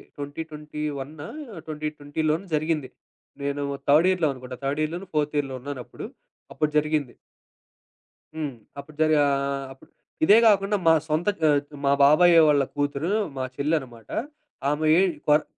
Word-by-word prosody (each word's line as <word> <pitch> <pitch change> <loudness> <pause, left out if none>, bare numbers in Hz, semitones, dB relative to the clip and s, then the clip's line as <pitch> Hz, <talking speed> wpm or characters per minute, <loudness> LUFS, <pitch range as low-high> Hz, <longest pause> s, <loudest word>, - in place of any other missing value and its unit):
Twenty 145 +2 -5
ట్వెంటీవన్నా, 150 -1 -6 0.4
2020 150 -1 -4
లోనో 165 +6 -1
జరిగింది. 155 -3 -1 0.5
నేను 140 0 -2 0.2
3 155 +5 +5
ఇయర్‌లో 175 -5 +2
అనుకుంటా. 125 -1 -9
థర్డ్ 140 +2 -1
ఇయర్‌‌‌‌‌‌‌‌లోనో, 170 +5 -3
ఫోర్త్ 150 0 0
ఇయర్‌లో 135 -2 -3
ఉన్నానప్పుడు. 135 -2 -7 0.5
అప్పుడు 150 0 0
జరిగింది. 150 -4 0 1.2
హ్మ్. 155 -3 -3 0.3
అప్పుడు 145 +2 -11
జరగా 155 -2 +4
ఆహ్, 140 0 -2
అప్పు 135 - -20 0.4
ఇదే 205 +7 +7
గాకుండా, 205 -1 +4
మా 165 - +8
సొంత 155 +3 -1 0.2
ఆహ్, 145 -2 +4 0.2
మా 140 - +4
బాబాయే, 165 +4 +7
వాళ్ళ 145 -2 +4
కూతురు 145 +4 -1 0.3
మా 130 - -2
చెల్లనమాట. 135 -6 -2 0.6
ఆమె 150 +2 0
ఏం 190 -1 +3 0.2
కరొ 150 +1 +5
150 Hz, 135 wpm, -25 LUFS, 140-155 Hz, 1.2 s, మా